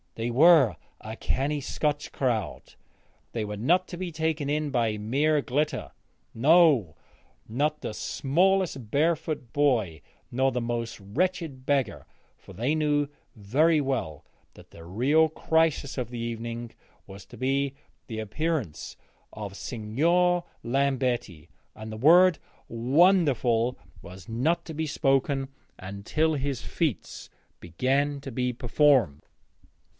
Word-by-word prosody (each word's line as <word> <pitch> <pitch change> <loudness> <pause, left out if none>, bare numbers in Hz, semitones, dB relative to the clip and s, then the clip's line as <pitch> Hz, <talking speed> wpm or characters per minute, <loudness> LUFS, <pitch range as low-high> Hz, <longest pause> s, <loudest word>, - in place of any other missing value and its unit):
They 115 +1 -3
were 140 - +6 0.2
a 110 +1 -8
canny 140 +5 -2
Scotch 145 +1 -2
crowd; 120 -6 -2 0.6
they 115 -2 -2
were 105 0 -5
not 175 - +2
to 175 - -7
be 180 -1 -4
taken 160 -2 -2
in 150 0 -1
by 115 -4 0
mere 145 +8 +1
glitter, 145 +3 -2 0.4
no, 140 - +4 0.5
not 150 +7 -1
the - - -4
smallest 160 - 0
barefoot 155 -3 0
boy 115 - +1 0.3
nor 130 +2 +1
the 125 - -2
most 115 -1 -3
wretched 140 - -2
beggar, 140 -2 0 0.3
for - - -15
they 120 - 0
knew 150 -2 +1 0.3
very 145 +10 +2
well 125 - -3 0.3
that - - -16
the 85 - -13
real 135 - +2
crisis 160 -3 0
of 125 -3 -3
the 120 -1 -6
evening 115 0 -5 0.4
was 95 0 -11
to - - -13
be 135 +1 0 0.3
the 110 -2 -5
appearance 115 - -3 0.3
of 100 -2 -7
Signor 170 - +1 0.2
Lambetti, 125 - -1 0.3
and 110 0 -8
the 110 - -6
word 170 +7 +6 0.3
'wonderful' 125 - +2 0.2
was 95 +1 -12
not 130 +10 0
to 160 - -7
be 160 +1 -3
spoken 135 -1 +1 0.3
until 100 +12 -1
his 140 -3 -2
feats 155 - -3 0.3
began 135 - 0
to 135 - -7
be 125 +1 -1
performed. 125 - +2
135 Hz, 125 wpm, -27 LUFS, 115-155 Hz, 0.6 s, were